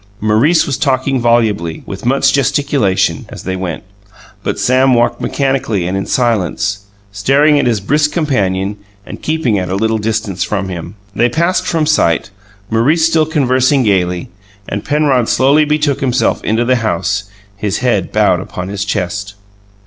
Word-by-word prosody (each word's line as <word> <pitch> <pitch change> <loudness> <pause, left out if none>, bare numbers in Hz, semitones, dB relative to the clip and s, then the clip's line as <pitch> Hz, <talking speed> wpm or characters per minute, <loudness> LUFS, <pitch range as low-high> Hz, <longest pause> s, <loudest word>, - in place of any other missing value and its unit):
Maurice 115 +11 +3
was 140 - -3
talking 130 0 0
volubly, 110 -8 +1
with 100 +4 -6
much 135 +1 +3
gesticulation, 140 -7 +1
as - - -9
they 95 +1 -3
went; 90 -3 -4 0.6
but - - -3
Sam 130 +5 +3
walked 120 0 +1
mechanically 135 -9 -1
and 90 +2 -2
in 95 - -3
silence, 105 -4 0 0.3
staring 140 +9 +3
at 140 - +1
his 115 -3 +1
brisk 150 +9 +1
companion 100 - -1 0.3
and - - -9
keeping 150 -10 0
at 90 -1 -3
a 95 - -1
little 110 +2 0
distance 105 -4 -2
from 100 -2 -3
him. 85 +1 -7 0.2
They 120 +4 +2
passed 170 +8 0
from 165 -3 +1
sight, 95 - +1 0.4
Maurice 145 +9 +3
still 160 -1 +2
conversing 130 -3 +2
gayly 90 -5 0 0.4
and 100 - -4
Penrod 145 -5 +1
slowly 145 +4 +3
betook 150 -2 0
himself 130 -1 0
into 115 +2 0
the 130 +1 +2
house, 105 -2 -1 0.3
his 100 0 -2
head 110 -8 0
bowed - - +2
upon 90 +1 -6
his 100 -1 -3
chest. 100 -1 -3
115 Hz, 155 wpm, -14 LUFS, 100-140 Hz, 0.6 s, Maurice